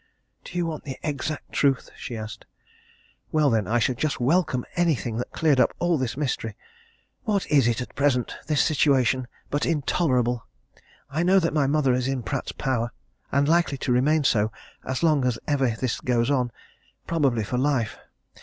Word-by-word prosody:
"Do 175 Hz, -, -7 dB
you 175 Hz, -, +1 dB
want 160 Hz, -2 st, -4 dB
the 135 Hz, -3 st, -5 dB
exact 150 Hz, 0 st, -3 dB
truth?" 135 Hz, -2 st, +1 dB
she 120 Hz, -, -6 dB
asked. 110 Hz, 0 st, -8 dB, 0.8 s
"Well, 150 Hz, -3 st, +3 dB
then, 110 Hz, -4 st, +1 dB
I 115 Hz, -, +2 dB
should 120 Hz, +1 st, 0 dB
just 155 Hz, -3 st, -1 dB
welcome 130 Hz, -1 st, +1 dB
anything 135 Hz, -, 0 dB
that 125 Hz, -, -3 dB
cleared 150 Hz, -5 st, +2 dB
up -, -, +3 dB
all 175 Hz, -1 st, +2 dB
this 130 Hz, -1 st, -2 dB
mystery! 120 Hz, -7 st, -2 dB, 0.7 s
What 205 Hz, -3 st, +1 dB
is 140 Hz, -5 st, +5 dB
it 120 Hz, 0 st, +1 dB
at 125 Hz, -, -7 dB
present, 140 Hz, -4 st, +1 dB
this 150 Hz, -2 st, +3 dB
situation, 130 Hz, -5 st, +2 dB, 0.2 s
but 145 Hz, -, 0 dB
intolerable? 130 Hz, -6 st, +1 dB, 0.6 s
I 155 Hz, +4 st, 0 dB
know 185 Hz, +3 st, +4 dB
that 165 Hz, -4 st, +2 dB
my 145 Hz, -3 st, +2 dB
mother 140 Hz, -2 st, +2 dB
is 125 Hz, 0 st, 0 dB
in 135 Hz, -2 st, -2 dB
Pratt's 135 Hz, +1 st, -3 dB
power, 125 Hz, -4 st, -1 dB, 0.4 s
and 140 Hz, +1 st, +2 dB
likely 165 Hz, -3 st, +2 dB
to 130 Hz, -, -2 dB
remain 145 Hz, +5 st, +3 dB
so 110 Hz, -5 st, +2 dB, 0.3 s
as 130 Hz, +4 st, -3 dB
long 155 Hz, -5 st, +4 dB
as 125 Hz, -2 st, +1 dB
ever 135 Hz, -4 st, +2 dB
this 130 Hz, -3 st, -1 dB
goes 120 Hz, +1 st, +1 dB
on 125 Hz, -3 st, +1 dB, 0.5 s
probably 140 Hz, -9 st, +1 dB
for 125 Hz, +4 st, -2 dB
life. 130 Hz, -5 st, 0 dB
135 Hz, 175 wpm, -25 LUFS, 125-155 Hz, 0.8 s, is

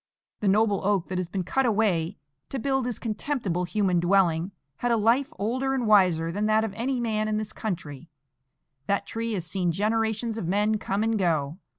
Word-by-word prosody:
The 210 Hz, -, -1 dB
noble 205 Hz, 0 st, +3 dB
oak, 195 Hz, -3 st, +1 dB
that 185 Hz, 0 st, -2 dB
has 180 Hz, -2 st, -3 dB
been 185 Hz, +1 st, -2 dB
cut 265 Hz, +9 st, +1 dB
away 200 Hz, -5 st, +1 dB, 0.3 s
to 270 Hz, -, -3 dB
build 265 Hz, 0 st, 0 dB
this 245 Hz, -3 st, -2 dB
contemptible 215 Hz, -, -2 dB
human 185 Hz, -2 st, +1 dB
dwelling, 175 Hz, -1 st, +2 dB, 0.3 s
had 245 Hz, -, -1 dB
a 230 Hz, -, +3 dB
life 240 Hz, +7 st, +2 dB
older 260 Hz, +6 st, -1 dB
and 250 Hz, -3 st, -1 dB
wiser 180 Hz, -6 st, +4 dB
than 205 Hz, +4 st, -1 dB
that 215 Hz, 0 st, +3 dB
of 220 Hz, -3 st, -3 dB
any 250 Hz, +4 st, -1 dB
man 215 Hz, -2 st, 0 dB
in 215 Hz, 0 st, 0 dB
this 215 Hz, 0 st, -4 dB
country. 165 Hz, -7 st, -5 dB, 0.8 s
That 200 Hz, -, 0 dB
tree 230 Hz, 0 st, -3 dB
has 180 Hz, -5 st, -2 dB
seen 175 Hz, +1 st, 0 dB
generations 220 Hz, +4 st, 0 dB
of 175 Hz, -, -4 dB
men 210 Hz, +3 st, +1 dB
come 200 Hz, +2 st, -1 dB
and 225 Hz, -1 st, +1 dB
go. 160 Hz, -3 st, 0 dB
210 Hz, 195 wpm, -26 LUFS, 180-225 Hz, 0.8 s, wiser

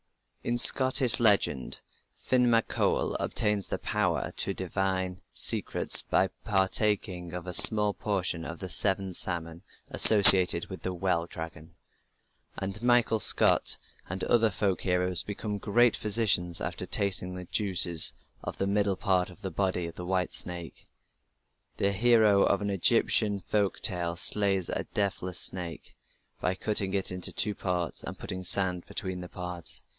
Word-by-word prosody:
In 120 Hz, 0 st, -3 dB
Scottish 130 Hz, 0 st, +5 dB
legend 100 Hz, -, +1 dB, 0.4 s
Finn 125 Hz, -1 st, 0 dB
mac 115 Hz, -1 st, +1 dB
Coul -, -, -1 dB
obtains 105 Hz, -2 st, -2 dB
the -, -, -4 dB
power -, -, -3 dB
to 95 Hz, -, -3 dB
divine 95 Hz, 0 st, -4 dB
secrets -, -, +2 dB
by -, -, -1 dB
partaking 95 Hz, -3 st, -1 dB
of 90 Hz, -1 st, -8 dB
a 90 Hz, -, -7 dB
small 105 Hz, +2 st, +8 dB
portion 90 Hz, -6 st, -4 dB
of 85 Hz, +1 st, -8 dB
the 95 Hz, -, -8 dB
seventh 95 Hz, 0 st, +2 dB
salmon 85 Hz, -2 st, -3 dB, 0.3 s
associated 95 Hz, -5 st, +6 dB
with 95 Hz, -, -11 dB
the 95 Hz, -1 st, -6 dB
"well 85 Hz, -2 st, -2 dB
dragon", 80 Hz, 0 st, -10 dB, 0.8 s
and 95 Hz, +2 st, -7 dB
Michael 120 Hz, -2 st, +1 dB
Scott 95 Hz, -, +3 dB, 0.3 s
and 95 Hz, +1 st, -6 dB
other 115 Hz, -2 st, +2 dB
folk 95 Hz, -1 st, -3 dB
heroes 90 Hz, -1 st, -2 dB
become 105 Hz, 0 st, -7 dB
great 120 Hz, +4 st, +1 dB
physicians 100 Hz, -6 st, 0 dB
after -, -, -6 dB
tasting 90 Hz, -2 st, +1 dB
the 90 Hz, 0 st, -9 dB
juices 90 Hz, -4 st, +2 dB, 0.3 s
of -, -, -7 dB
the 95 Hz, -, -3 dB
middle 100 Hz, 0 st, -1 dB
part 90 Hz, -2 st, -1 dB
of 90 Hz, -, -18 dB
the 95 Hz, -, -6 dB
body 95 Hz, 0 st, -3 dB
of 85 Hz, -, -9 dB
the 90 Hz, -, -10 dB
white 90 Hz, -1 st, -3 dB
snake. 85 Hz, -2 st, -3 dB, 0.9 s
The 100 Hz, -, -1 dB
hero 110 Hz, -1 st, +2 dB
of 100 Hz, +1 st, 0 dB
an 100 Hz, -, -3 dB
Egyptian 105 Hz, 0 st, +1 dB
folk 100 Hz, +1 st, -3 dB
tale 85 Hz, -2 st, -1 dB
slays 95 Hz, 0 st, 0 dB
a -, -, -4 dB
"deathless 95 Hz, -3 st, -2 dB
snake" 85 Hz, -4 st, -1 dB, 0.5 s
by 90 Hz, -, -2 dB
cutting 100 Hz, -1 st, -1 dB
it 95 Hz, -2 st, -3 dB
in 90 Hz, 0 st, -7 dB
two 105 Hz, +3 st, -2 dB
parts 90 Hz, -5 st, -5 dB
and -, -, -9 dB
putting 95 Hz, 0 st, -8 dB
sand 90 Hz, -1 st, -1 dB
between 95 Hz, -1 st, -6 dB
the 90 Hz, -, -10 dB
parts. 90 Hz, -1 st, -8 dB
95 Hz, 150 wpm, -26 LUFS, 90-105 Hz, 0.9 s, small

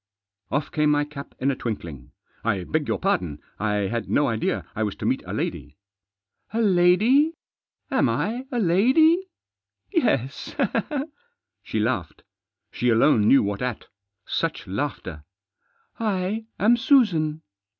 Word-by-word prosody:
Off 145 Hz, +2 st, -2 dB
came 150 Hz, -3 st, +2 dB
my 145 Hz, 0 st, +2 dB
cap 145 Hz, -1 st, -10 dB
in 135 Hz, +2 st, +1 dB
a -, -, -2 dB
twinkling. 85 Hz, -, -6 dB, 0.2 s
" -, -, -36 dB
I 100 Hz, -5 st, 0 dB
beg 150 Hz, -, -1 dB
your -, -, 0 dB
pardon. 90 Hz, -, -1 dB, 0.2 s
I 105 Hz, +1 st, 0 dB
had 115 Hz, +2 st, -3 dB
no 145 Hz, -, +3 dB
idea 110 Hz, -1 st, -1 dB
I 110 Hz, -, -3 dB
was 105 Hz, -2 st, -1 dB
to -, -, -6 dB
meet -, -, +1 dB
a -, -, -5 dB
lady." 75 Hz, +1 st, -4 dB, 0.4 s
" 100 Hz, -, -38 dB
A -, -, +1 dB
lady? 215 Hz, -, +4 dB, 0.6 s
Am -, -, +3 dB
I 245 Hz, +5 st, -2 dB
a 245 Hz, -, -2 dB
lady? 265 Hz, -, +4 dB, 0.6 s
Yes? 215 Hz, -, 0 dB, 0.8 s
" 475 Hz, -, -59 dB
She -, -, -3 dB
laughed. -, -, -2 dB, 0.5 s
She 125 Hz, -, 0 dB
alone 115 Hz, -2 st, +4 dB
knew 135 Hz, -, +6 dB
what 100 Hz, 0 st, -3 dB
at. 125 Hz, -3 st, -4 dB, 0.4 s
Such 165 Hz, -8 st, -2 dB
laughter! 95 Hz, -, -4 dB, 0.8 s
"I 210 Hz, 0 st, -1 dB
am 230 Hz, +4 st, +4 dB
Susan." 175 Hz, -, +2 dB
150 Hz, 145 wpm, -24 LUFS, -, 0.8 s, knew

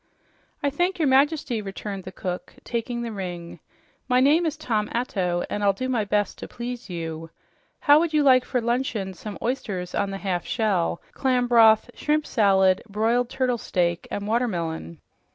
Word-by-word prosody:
"I 285 Hz, -, +2 dB
thank 355 Hz, +6 st, 0 dB
your 315 Hz, -4 st, +2 dB
Majesty," 275 Hz, -3 st, +2 dB
returned 195 Hz, -1 st, -6 dB
the 185 Hz, -, -7 dB
cook, 180 Hz, -1 st, -5 dB
taking 235 Hz, 0 st, -3 dB
the 230 Hz, -, -4 dB
ring. 175 Hz, -4 st, -6 dB, 0.5 s
"My 250 Hz, -1 st, +3 dB
name 305 Hz, +6 st, +4 dB
is 310 Hz, -1 st, -3 dB
Tom 220 Hz, -8 st, -1 dB
Atto, 185 Hz, -7 st, -1 dB
and 205 Hz, -, -3 dB
I'll 200 Hz, -1 st, +4 dB
do 255 Hz, +7 st, -4 dB
my 235 Hz, -5 st, 0 dB
best 205 Hz, 0 st, 0 dB
to -, -, -6 dB
please 240 Hz, -1 st, -6 dB
you. 165 Hz, -2 st, -5 dB, 0.5 s
How 290 Hz, 0 st, +6 dB
would 335 Hz, 0 st, 0 dB
you 305 Hz, -2 st, +3 dB
like 255 Hz, -2 st, +6 dB
for 250 Hz, 0 st, -1 dB
luncheon 235 Hz, -5 st, -1 dB
some 205 Hz, +4 st, -8 dB
oysters 200 Hz, -8 st, -3 dB
on 200 Hz, -, 0 dB
the 195 Hz, -, -4 dB
half 185 Hz, -3 st, -2 dB
shell, 190 Hz, -7 st, 0 dB
clam 255 Hz, -2 st, +1 dB
broth, 230 Hz, -1 st, +5 dB
shrimp 300 Hz, 0 st, 0 dB
salad, 190 Hz, -3 st, +3 dB
broiled 230 Hz, +4 st, +1 dB
turtle 255 Hz, -2 st, 0 dB
steak 175 Hz, -4 st, -1 dB
and 200 Hz, -, -4 dB
watermelon?" 170 Hz, -, -2 dB
220 Hz, 170 wpm, -24 LUFS, 190-255 Hz, 0.5 s, How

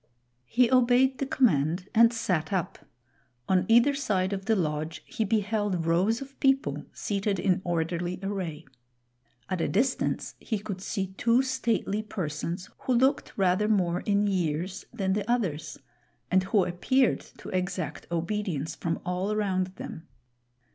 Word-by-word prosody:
He 245 Hz, 0 st, +3 dB
obeyed 255 Hz, +1 st, +4 dB
the 275 Hz, -, -1 dB
command 180 Hz, -, +2 dB
and 230 Hz, 0 st, +6 dB
sat 180 Hz, -9 st, -1 dB
up. 185 Hz, -4 st, -3 dB, 0.6 s
On 185 Hz, -1 st, +2 dB
either 235 Hz, +5 st, +5 dB
side 200 Hz, -9 st, 0 dB
of 195 Hz, -1 st, -4 dB
the 225 Hz, -, +3 dB
lodge 155 Hz, -2 st, -2 dB
he 225 Hz, -, -2 dB
beheld 205 Hz, -4 st, 0 dB
rows 185 Hz, +8 st, +2 dB
of 275 Hz, 0 st, -16 dB
people 270 Hz, -, +1 dB
seated 200 Hz, -1 st, -1 dB
in 185 Hz, 0 st, +1 dB
orderly 175 Hz, +1 st, -1 dB
array. 180 Hz, -6 st, -4 dB, 0.8 s
At 185 Hz, -3 st, -2 dB
a -, -, +1 dB
distance 250 Hz, +6 st, 0 dB
he 220 Hz, -, -2 dB
could 200 Hz, -2 st, -6 dB
see 195 Hz, -2 st, -3 dB
two 235 Hz, +3 st, +4 dB
stately 230 Hz, -5 st, 0 dB
persons, 175 Hz, -3 st, -4 dB
who 255 Hz, -, 0 dB
looked 265 Hz, +3 st, +1 dB
rather 190 Hz, +1 st, +2 dB
more 180 Hz, -5 st, +2 dB
in 205 Hz, 0 st, +1 dB
years 180 Hz, -2 st, -1 dB
than 195 Hz, -5 st, -1 dB
the 205 Hz, +2 st, -2 dB
others, 160 Hz, -11 st, -1 dB, 0.5 s
and 185 Hz, 0 st, +3 dB
who 195 Hz, -1 st, +3 dB
appeared 235 Hz, +9 st, +2 dB, 0.2 s
to -, -, -9 dB
exact 180 Hz, -4 st, -3 dB
obedience 170 Hz, -3 st, -2 dB
from 165 Hz, -1 st, -2 dB
all 180 Hz, +3 st, -1 dB
around 195 Hz, -3 st, 0 dB
them. 160 Hz, -2 st, -8 dB
195 Hz, 145 wpm, -28 LUFS, 175-225 Hz, 0.8 s, and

